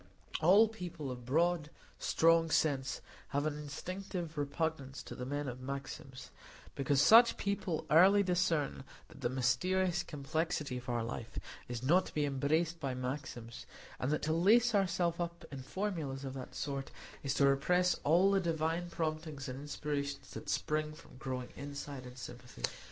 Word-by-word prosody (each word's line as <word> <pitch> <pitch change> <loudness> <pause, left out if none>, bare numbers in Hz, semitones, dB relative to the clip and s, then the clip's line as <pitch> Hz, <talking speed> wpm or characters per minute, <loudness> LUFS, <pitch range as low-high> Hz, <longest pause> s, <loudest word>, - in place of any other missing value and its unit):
All 195 +7 +7
people 175 -10 -6
of 125 -1 -8
broad, 165 +2 +2 0.3
strong 165 0 +4
sense 140 -4 +1 0.3
have 145 +1 -1
an 155 -1 0
instinctive 170 +3 -5
repugnance 145 -2 -2
to - - -8
the 125 - -5
men 145 +1 -2
of 125 0 -5
maxims; 135 -1 -6 0.4
because 140 0 +1
such 230 - +8
people 195 -5 -2
early 190 +6 +7
discern 175 -7 +1 0.3
that - - -14
the 120 - +1
mysterious 170 +9 +1
complexity 150 -2 -2
of 125 0 -8
our 120 -1 0
life 115 0 -6 0.3
is 120 0 -5
not 175 +8 +4
to - - -10
be 150 -1 +2
embraced 155 +5 +1
by 135 -4 -2
maxims, 125 -2 -5 0.3
and 130 - -1
that 150 - 0
to 155 - +1
lace 225 +8 +5
ourselves 180 -4 +1
up 170 -1 -4
in 135 -2 -6
formulas 150 -5 -3
of 130 - -4
that 130 -2 -8
sort 140 -2 -3 0.3
is 140 -1 -1
to 140 - +4
repress 180 +7 +3
all 175 +6 +5
the 195 - +4
divine 165 +1 -1
promptings 155 -3 -3
and 130 +1 -5
inspirations 145 -1 -3
that - - -7
spring 155 -1 0
from 155 -4 -15
growing 130 -2 -4
insight 140 -2 -6
and 125 +1 -11
sympathy. 125 0 -10
150 Hz, 160 wpm, -34 LUFS, 135-170 Hz, 0.4 s, such